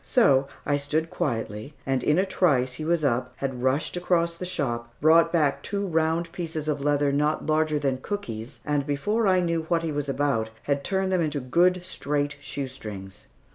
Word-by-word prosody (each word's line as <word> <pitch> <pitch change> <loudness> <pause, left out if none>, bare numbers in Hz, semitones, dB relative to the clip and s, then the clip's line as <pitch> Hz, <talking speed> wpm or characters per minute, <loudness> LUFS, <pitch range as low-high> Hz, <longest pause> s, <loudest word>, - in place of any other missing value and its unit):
So 140 - +4 0.2
I 145 - +2
stood 155 +3 -1
quietly, 115 -5 -3
and 135 -2 0
in 150 +5 +2
a 190 - +3
trice 135 -10 +2
he 155 - -6
was 165 -2 +1
up, 125 -1 0
had 130 -2 -4
rushed 130 +7 +1
across 175 -1 +1
the 180 +2 -6
shop, 120 -9 -2
brought 165 +2 +5
back 150 -5 +2
two 200 0 -2
round 165 -1 0
pieces 160 -3 -4
of 150 -2 -1
leather 145 0 +2
not 150 +2 +1
larger 155 0 +2
than 135 -3 0
cookies, 130 - -5
and 145 -1 0
before 205 +10 +1
I 185 -1 +4
knew 170 -2 0
what 165 -1 +2
he 165 - -1
was 145 -1 -2
about, 135 -6 0
had 140 -1 0
turned 190 +2 0
them 185 -2 +2
into 150 -2 -1
good 175 +7 +2
straight 145 -4 -1
shoestrings. 110 -10 -7
150 Hz, 185 wpm, -26 LUFS, 135-170 Hz, 0.2 s, brought